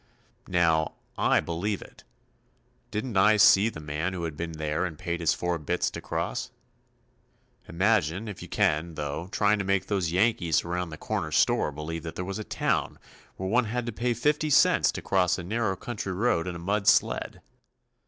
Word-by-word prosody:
Now, 80 -3 +2 0.2
I - - +3
believe 90 +5 -3
it. - - -17 0.9
Didn't 110 0 -3
I 105 +3 +5
see 105 +1 +6
the 90 - -9
man 75 +4 -3
who 90 -2 -4
had 80 -3 -4
been 85 +2 -5
there 75 +1 -2
and 85 -4 -4
paid 85 -2 -3
his 85 -2 +2
four 90 -1 -2
bits 75 - -1
to - - -7
cross? - - -3 1.2
Imagine, 95 +1 +1
if 100 - -7
you 90 - -8
can, 85 -5 0
though, 75 +5 -4
trying 105 +1 +2
to - - -1
make 95 0 +1
those 95 -5 -1
Yankees 90 -5 +2
around 90 0 -2
the 80 - -8
corner - - -3
store - - +2
believe 80 +3 -5
that 80 0 -7
there 90 - -4
was 100 +3 -4
a - - -4
town - - -1 0.4
where 95 - -3
one 120 +5 +2
had 120 +2 -2
to 120 - -3
pay 120 +2 -1
50 150 +5 +1
cents 145 - +4
to - - -6
cross 90 -2 +2
a 90 - -6
narrow 105 +1 -1
country 100 -2 -5
road 90 -4 +1
in 90 - -4
a - - -5
mud 100 +4 -1
sled. - - +2
90 Hz, 190 wpm, -27 LUFS, 85-105 Hz, 1.2 s, see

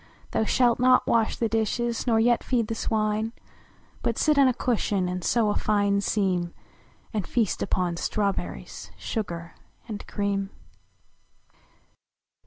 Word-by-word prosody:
Than 220 - +1
shalt 240 +1 +3
not 255 0 +5
wash 225 -2 +2
the 230 - +1
dishes, 225 +2 -1
nor 225 -2 +4
yet 240 +1 +3
feed 235 -4 0
the - - -1
swine, 220 0 -1 0.7
But - - -1
sit 305 -2 +3
on 275 - +7
a 255 - +3
cushion 205 -7 0
and 180 0 -3
sew 220 0 +2
a - - -2
fine 205 -1 +2
seam, 185 -4 0 0.6
And 205 -5 -2
feast 225 -6 0
upon 180 -3 0
strawberries, 200 +2 -3
sugar 170 -6 -4 0.3
and 210 -3 -6
cream. 200 -1 -1
215 Hz, 135 wpm, -26 LUFS, 200-235 Hz, 0.7 s, on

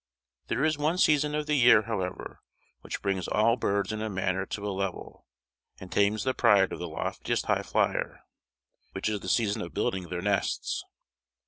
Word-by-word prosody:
There - - -1
is 155 -1 +1
one 155 +4 +1
season 150 -3 +3
of 150 0 -1
the 150 - -1
year, 120 -6 +6
however, 95 -5 -4 0.4
which - - -7
brings 95 -3 -1
all 115 +2 +3
birds 100 -3 -1
in 110 0 -4
a 110 - -2
manner 95 -1 -1
to 105 0 -4
a 100 - -2
level, 95 -1 -5 0.5
and 95 - -10
tames 100 +1 +2
the 130 - 0
pride 100 -7 +4
of - - -6
the 90 - -5
loftiest 80 - -2
highflyer; - - 0 0.7
which 95 - -2
is 105 -1 -1
the 95 - -6
season 105 +1 +1
of 85 - -7
building 95 -3 -1
their 90 0 -4
nests. 100 -1 -1
105 Hz, 180 wpm, -28 LUFS, 95-115 Hz, 0.7 s, year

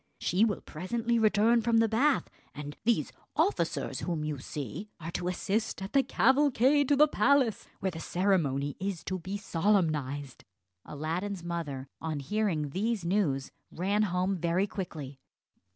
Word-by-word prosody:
She 185 +5 +2
will 215 -3 +1
presently 230 +8 -1
return 220 +2 +4
from 230 0 +2
the 225 0 +5
bath; 260 +6 +2 0.3
and 145 0 -6
these 235 0 +2 0.2
officers 405 - 0
whom 170 -4 -2
you 150 -3 -3
see 145 - -6
are 165 +1 -6
to 175 - -3
assist 200 +4 -1
at 195 +4 -6
the 275 - +6
cavalcade 275 0 +3
to 290 - +5
the 300 +2 +6
palace, 275 -6 +2
where 190 - 0
the 165 - -7
ceremony 160 -7 0
is 190 -3 -3
to 185 -1 -3
be 190 +4 -4
solemnised." 155 - 0 0.4
Aladdin's 170 +6 -3
mother, 155 -6 -4
on 160 -2 -2
hearing 160 -2 -1
these 210 +2 -1
news, 170 -8 0 0.2
ran 200 +4 0
home 185 -1 0
very 175 +3 +1
quickly. 155 -9 -6
185 Hz, 150 wpm, -30 LUFS, 155-220 Hz, 0.4 s, the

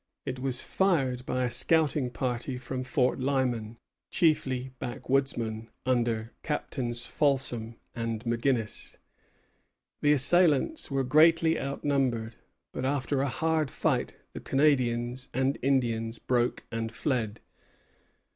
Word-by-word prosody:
It 130 - -4
was 130 -1 -2
fired 135 -10 +1
by 130 0 0
a 125 - -1
scouting 145 +1 +2
party 125 +1 -3
from 130 +1 -4
Fort 130 -1 +1
Lyman, 125 -4 -1 0.3
chiefly 130 -6 +1
backwoodsmen, 120 -3 -1 0.2
under 120 -3 0
Captains 120 -6 -2
Folsom 130 -7 0 0.2
and 115 -2 -3
McGinnis. 115 -1 -1 1.0
The 145 0 +5
assailants 170 - +3
were 135 -1 0
greatly 160 +4 +4
outnumbered; 135 -5 -1 0.4
but - - -5
after 135 0 0
a 140 - 0
hard 160 +1 0
fight - - -1 0.2
the - - -6
Canadians 125 -3 +1
and 130 +2 +1
Indians 115 -4 0
broke 120 -1 0
and 115 0 -3
fled. 115 -3 -2
130 Hz, 110 wpm, -28 LUFS, 120-140 Hz, 1.0 s, The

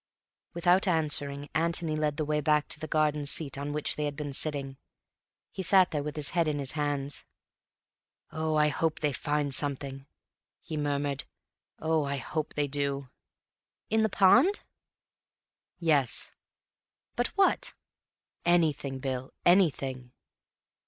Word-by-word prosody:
Without 180 +3 +3
answering, 145 -4 0
Antony 165 0 0
led 150 -1 -1
the 155 - -1
way 150 0 0
back 150 0 +2
to - - +1
the 155 - -5
garden 150 -2 +1
seat 145 0 -2
on 140 +1 -4
which 150 0 +1
they 150 - -2
had 145 -1 -3
been 145 -1 -5
sitting. 135 -2 -2 0.7
He 190 - -5
sat 190 0 +5
there 150 - -1
with 150 +1 -5
his 150 -2 +1
head 170 -2 +1
in 150 -1 0
his 140 -2 -3
hands. 145 -2 0 1.1
"Oh, 155 0 -1
I 150 0 +4
hope 160 +2 -1
they 150 -2 +1
find 145 0 -1
something," 135 0 -4 0.5
he 160 - -7
murmured. 145 -2 -1 0.5
"Oh, 160 -1 +1
I 140 0 -2
hope 155 +4 -4
they 145 -1 +1
do." 140 -1 -2 0.8
"In 220 0 +3
the 220 - +2
pond?" 245 - +5 1.2
"Yes." 145 -8 +1 0.8
"But 245 - +1
what?" 395 - +2 0.7
"Anything, 155 -6 +2
Bill; 130 -1 -4
anything." 135 -9 +2
150 Hz, 140 wpm, -29 LUFS, 140-160 Hz, 1.2 s, sat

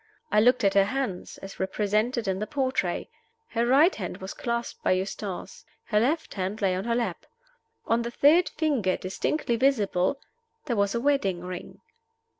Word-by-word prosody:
I 210 - +5
looked 250 +2 +4
at 195 - +4
her 195 -1 +5
hands, 225 -5 -3
as 195 - -9
represented 210 +4 0
in 190 0 0
the 215 - -3
portrait. 260 -11 -1 0.4
Her 235 +1 0
right 290 +9 +5
hand 185 -5 -5
was 190 +1 -7
clasped 235 0 -3
by - - +3
Eustace; 190 0 -4 0.2
her 210 - +1
left 295 +8 0
hand 195 +2 -3
lay 195 -3 +2
on 185 - -3
her 235 0 +1
lap. 230 -8 -2 0.6
On 230 +1 +2
the 235 - -3
third 300 +8 +4
finger, 270 - 0
distinctly 235 +6 -1
visible, 225 -3 +2 0.5
there 245 -6 -1
was 200 0 +1
a - - +1
wedding 235 -10 +1
ring. 180 0 -8
220 Hz, 170 wpm, -27 LUFS, 190-255 Hz, 0.6 s, I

